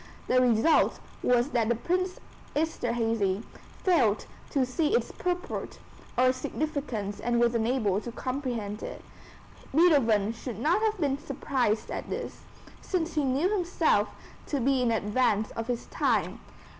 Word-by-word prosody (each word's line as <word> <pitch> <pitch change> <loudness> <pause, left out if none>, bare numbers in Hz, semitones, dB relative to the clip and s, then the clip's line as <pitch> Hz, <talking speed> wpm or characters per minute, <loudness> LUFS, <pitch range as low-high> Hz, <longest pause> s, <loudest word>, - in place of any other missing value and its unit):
The 255 0 +4
result 245 +5 +3 0.2
was 245 +3 +2
that 235 -1 +1
Prince 370 +1 0 0.4
Esterhazy 230 -9 0 0.4
failed 255 - +3 0.2
to 270 -3 +2
see 300 - +1
its - - 0
purport 360 0 -3 0.4
or 255 +1 +5
significance 255 -7 -3
and 240 +2 +1
was 240 0 +3
unable 225 -4 +1
to 235 - -6
comprehend 240 -5 -3
it. - - -7 0.7
Beethoven 230 - +4
should 230 -1 -6
not 320 - +2
have 435 -1 +1
been 280 -3 0
surprised 260 -6 -1
at - - -5
this, - - -5 0.4
since 345 -3 -2
he 300 - +1
knew 280 +9 +1
himself 330 - +2 0.4
to 285 - -1
be 265 +1 +2
in 245 - +2
advance 220 0 +1
of 230 0 -5
his 245 -1 -2
time. - - 0
250 Hz, 135 wpm, -28 LUFS, 225-300 Hz, 0.7 s, or